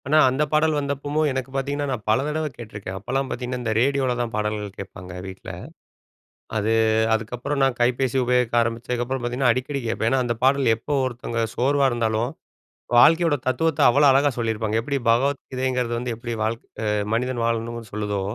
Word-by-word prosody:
ஆனா, 155 +2 +4
அந்த 130 +4 +1
பாடல் 155 0 +3
வந்தப்பமும், 145 +2 -1
எனக்கு 130 0 -3
பார்த்தீங்கன்னா, 140 +2 -1
நான் 120 -5 -3
பல 110 +4 +3
தடவ 155 +1 -1
கேட்டுருக்கேன். 105 -5 -7
அப்பலாம் 135 +7 -2
பார்த்தீங்கன்னா, 125 0 -4
இந்த 110 -2 0
ரேடியோவுல 135 0 +2
தான் 120 -1 -3
பாடல்கள் 105 -2 -3
கேட்பாங்க 90 -2 -9
வீட்ல. 95 0 -8 1.1
அது 110 +1 +1 0.4
அதுக்கப்புறம் 120 +6 -2
நான் 135 -2 +2
கைபேசி 125 +1 +1
உபயோகிக்க 125 -1 +1
ஆரம்பிச்சதுக்கப்பறம் 120 +2 -2
பார்த்தீங்கன்னா, 120 +1 +2
அடிக்கடி 135 +3 -3
கேட்பேன். 115 0 0
ஏன்னா, 135 -1 +2
அந்த 120 -1 -1
பாடல் 135 -3 +4
எப்போ 145 +6 -3
ஒருத்தவங்க 120 -1 -4
சோர்வா 140 +2 +3
இருந்தாலும், 115 +1 0 0.7
வாழ்க்கையோட 165 +4 +6
தத்துவத்த 145 +4 +1
அவ்ளோ 140 +4 +5
அழகா 140 +2 +4
சொல்லியிருப்பாங்க. 110 -1 0
எப்பிடி 140 +3 -2
பகவத் 135 +4 +1
கீதைங்கிறது 130 -2 -1
வந்து, 120 0 -3
எப்பிடி 120 0 -5
வாழ் 110 +1 0 0.6
மனிதன் 125 0 -1
வாழணுன்னு 115 -1 -3
சொல்லுதோ, 105 -1 -2
125 Hz, 155 wpm, -23 LUFS, 115-135 Hz, 1.1 s, வாழ்க்கையோட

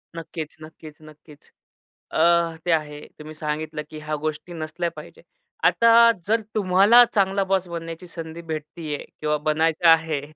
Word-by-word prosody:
नक्कीच, 160 -1 -7
नक्कीच, 155 -1 -13
नक्कीच. 155 -1 -17 0.6
अ, 170 0 +2
ते 175 - +1
आहे. 150 -2 -1 0.2
तुम्ही 155 +1 -9
सांगितलं 155 0 -4
की 155 - -9
ह्या 155 0 -4
गोष्टी 155 +3 -4
नसल्या 165 +2 -4
पाहिजेत. - - -12 0.4
आता 230 0 +6 0.2
जर 225 +1 +2
तुम्हाला 205 +4 +6
चांगला 195 -1 +2
बॉस 190 -2 +1
बनण्याची 165 +1 -7
संधी 165 0 -8
भेटतीये 155 0 -5 0.2
किंवा 150 0 0
बनायचं 160 +2 +1
आहे, 160 -3 +3
160 Hz, 140 wpm, -23 LUFS, 155-175 Hz, 0.6 s, आता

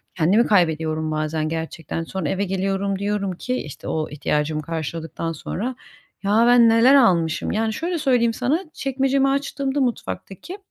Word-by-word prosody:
Kendimi 195 +9 +3
kaybediyorum 160 -4 +1
bazen 155 0 -1
gerçekten. 165 0 -4
Sonra 165 -2 -4
eve 195 +5 0
geliyorum, 195 +1 -1
diyorum 200 -1 -1
ki 250 +8 -3
işte, 150 - -8
o 155 -1 -2
ihtiyacımı 150 +1 -1
karşıladıktan 165 +1 -4
sonra, 225 - -4 0.5
"Ya 210 +3 +3
ben 240 -1 +6
neler 230 +4 +6
almışım?" 175 -11 +3
Yani 220 0 0
şöyle 340 +5 -2
söyleyeyim 245 -4 +2
sana, 265 +10 0
çekmecemi 270 0 +1
açtığımda, 280 0 -1
mutfaktaki 245 - -4
195 Hz, 140 wpm, -22 LUFS, 160-245 Hz, 0.5 s, ben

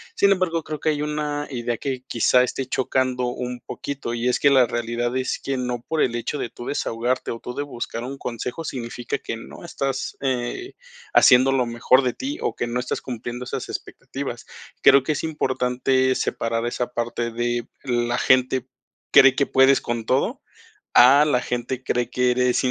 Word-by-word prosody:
Sin 200 - +4
embargo, 180 -3 0
creo 155 -2 -5
que 155 - +1
hay 150 -1 0
una 150 -1 -2
idea 120 -3 -3
que, 130 -3 -4
quizá, 125 +2 +3
esté 130 +1 -3
chocando 130 0 0
un 125 0 -4
poquito, 140 -4 -5
y 120 +1 -1
es 125 - +1
que 140 - +6
la 130 -2 +6
realidad 120 +1 -2
es 130 0 -1
que 135 - -2
no 125 -2 -3
por 160 - 0
el 120 - +1
hecho 120 +5 -3
de 120 - -3
tú 120 - -10
desahogarte, 125 -2 -1
o 115 - -5
tú 125 - -7
de 145 - -2
buscar 120 -4 -5
un 135 +3 -6
consejo 125 +5 -5
significa 125 -5 -5 0.3
que 115 - -4
no 115 - -11
estás, 135 -5 -3
eh, 130 - -2 0.4
haciendo 130 +1 +6
lo 130 -2 +2
mejor 120 +3 +3
de 125 -2 -1
ti, 280 +3 -5
o - - -1
que - - -2
no 120 +1 -2
estás 125 - -3
cumpliendo 120 0 -6
esas - - -5
expectativas. - - -6 0.4
Creo 140 - +7
que 155 - -1
es 145 - -4
importante 130 -3 +1
separar 115 -1 -1
esa 120 0 -2
parte 120 0 -2
de 120 +1 -2 0.2
la 120 -2 0
gente 130 0 +2 0.4
cree 135 -1 +7
que 140 - +2
puedes 135 +1 +5
con 120 -1 -3
todo, 130 - 0 0.5
a 135 +4 +8
la 145 -5 +2
gente 125 +1 -3
cree 120 -1 -1
que 125 0 +2
eres 125 0 +1
125 Hz, 190 wpm, -23 LUFS, 120-135 Hz, 0.5 s, a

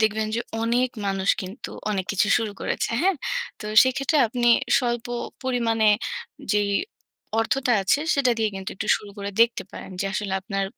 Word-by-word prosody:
দেখবেন 220 0 +1
যে 235 - 0 0.2
অনেক 245 +2 +2 0.2
মানুষ 195 0 -1
কিন্তু 190 +7 -7 0.2
অনেক 190 -3 -1
কিছু 200 +1 +2
শুরু 220 -2 -3
করেছে। - - -1
হ্যাঁ? 375 -2 +3 0.4
তো - - -8 0.2
সেক্ষেত্রে 275 +4 +1
আপনি 240 0 +1 0.3
স্বল্প 240 -2 -1 0.4
পরিমাণে 230 -4 +2 0.6
যেই 205 -1 +2 0.7
অর্থটা 255 +2 +1
আছে 195 +9 +2
সেটা 275 -4 +3
দিয়ে 220 -1 +2
কিন্তু 190 0 -5
একটু - - -4
শুরু 205 - -11
করে 200 0 -4
দেখতে 230 0 +4
পারেন। - - -9
যে - - 0
আসলে 195 -1 -2
আপনার 195 -1 -2
225 Hz, 160 wpm, -24 LUFS, 200-245 Hz, 0.7 s, দেখতে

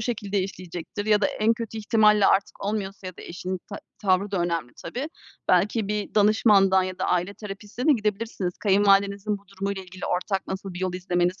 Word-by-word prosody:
şekilde 210 -3 -2
işleyecektir 185 +2 -6
ya 210 -1 +4
da - - +4
en 220 +1 +2
kötü 225 -1 -5
ihtimalle 210 -1 +4
artık 195 0 +1
olmuyorsa 200 -2 -3
ya 185 - -7
da - - -10
eşinin 180 +1 -5
ta 200 - -5 0.2
tavrı 195 0 +1
da 200 - -1
önemli 165 -8 -2
tabii, 245 - -4 0.4
belki 210 0 +2
bir 210 -1 -3
danışmandan 205 -2 +5
ya 185 0 -4
da - - -1
aile 180 +3 0
terapistine 210 +5 -6
de 310 - +7
gidebilirsiniz. 210 -4 -1
Kayınvalidenizin 200 0 +3
bu 200 -1 -27
durumuyla 195 0 -4
ilgili 185 0 -8
ortak 190 +2 -1
nasıl 190 -1 -5
bir 180 - -6
yol 185 -1 -1
izlemeniz 180 0 0
200 Hz, 185 wpm, -25 LUFS, 185-210 Hz, 0.4 s, de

